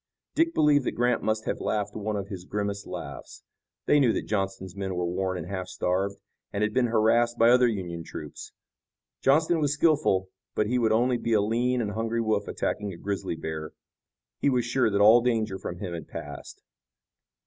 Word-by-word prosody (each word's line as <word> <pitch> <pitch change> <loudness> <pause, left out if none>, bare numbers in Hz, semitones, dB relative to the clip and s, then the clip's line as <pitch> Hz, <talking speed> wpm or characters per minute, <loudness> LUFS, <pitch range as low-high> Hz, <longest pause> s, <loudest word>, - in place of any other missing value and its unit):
Dick 330 +1 +2
believed 150 -2 +4
that - - 0
Grant 120 0 +1
must 110 0 -1
have - - -2
laughed 105 -1 -1
one 110 0 -2
of 100 -1 -3
his 95 -3 -6
grimmest 100 +1 -3
laughs. - - -8 0.4
They 145 - +4
knew 130 -5 +4
that - - -2
Johnston's 95 -3 -3
men 95 -2 -3
were 90 0 -1
worn 95 +1 -1
and 85 - -5
half 95 0 -4
starved, 95 +2 -1 0.4
and 100 - -1
had 105 0 0
been 125 0 +3
harassed 120 +1 +3
by 115 +1 +6
other 125 0 +6
Union 90 -7 -3
troops. - - -9 0.7
Johnston 160 +5 +3
was 145 -2 +1
skillful, 150 - +2 0.3
but 105 - +2
he 125 +4 +1
would 115 -2 +2
only 120 +3 +3
be 115 - -1
a 110 - +5
lean 120 +4 +1
and 105 -3 -2
hungry 115 +2 -2
wolf 110 -3 0
attacking 105 -1 -2
a 85 - -9
grizzly 100 -2 -3
bear. 80 -1 -5 0.7
He - - +2
was 125 -3 +1
sure 125 -1 +2
that 100 -1 +1
all 110 +4 +8
danger 110 -5 0
from 90 - -5
him 90 -2 -5
had 80 -3 -6
passed. 70 -1 -9
110 Hz, 195 wpm, -27 LUFS, 95-120 Hz, 0.7 s, all